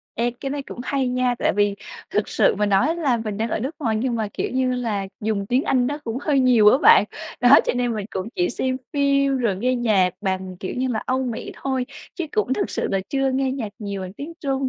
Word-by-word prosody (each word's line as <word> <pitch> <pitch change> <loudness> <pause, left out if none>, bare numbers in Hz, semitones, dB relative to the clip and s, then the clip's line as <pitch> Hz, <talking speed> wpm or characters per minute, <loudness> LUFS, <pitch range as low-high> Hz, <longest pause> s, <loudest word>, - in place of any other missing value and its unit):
Ê, 235 +2 +1
cái 270 - -3
này 285 0 -3
cũng 250 - -9
hay 265 -1 -1
nha. 250 0 +1
Tại - - +2
vì 205 0 +2 0.4
thực 210 - 0
sự - - +3
mà 210 +1 +1
nói 250 - +2
là 280 -8 +1
mình 215 -3 -4
đang 225 +2 -1
ở - - 0
nước 270 +7 -3
ngoài 225 -8 0
nhưng 240 +2 -1
mà, 220 -2 -1
kiểu - - -2
như 255 0 +1
là, 215 -6 -2
dùng 205 -2 -1
tiếng 255 +5 +2
Anh 250 -2 +2
nó 290 +2 -2
cũng 230 +1 -3
hơi 285 -3 +2
nhiều 245 -5 +6
á - - +4
bạn. 450 +8 +7 0.4
Đó, 245 +4 +8
cho - - +2
nên 245 -1 0
mình 210 -2 -4
cũng 190 +3 -4
chỉ 175 - +1
xem 260 0 -1 0.2
phim 275 -1 +2
rồi 225 -6 0
nghe 250 +6 +1
nhạc 210 -7 +2
bằng, 190 -2 -3
kiểu 185 - -4
như 260 +1 0
là, 225 -3 -2
Âu 260 +1 0
Mỹ 240 -2 -4
thôi 260 -2 -1 0.3
chứ 345 - -3
cũng 430 -11 +1
thực 210 - -1
sự - - -2
là 195 - +1
chưa 270 -1 +1
nghe 265 0 0
nhạc 255 -5 -3
nhiều 200 -3 -5
bằng 185 0 -7
tiếng 285 +9 -8
Trung, 270 -2 -1
245 Hz, 255 wpm, -22 LUFS, 210-270 Hz, 0.4 s, Đó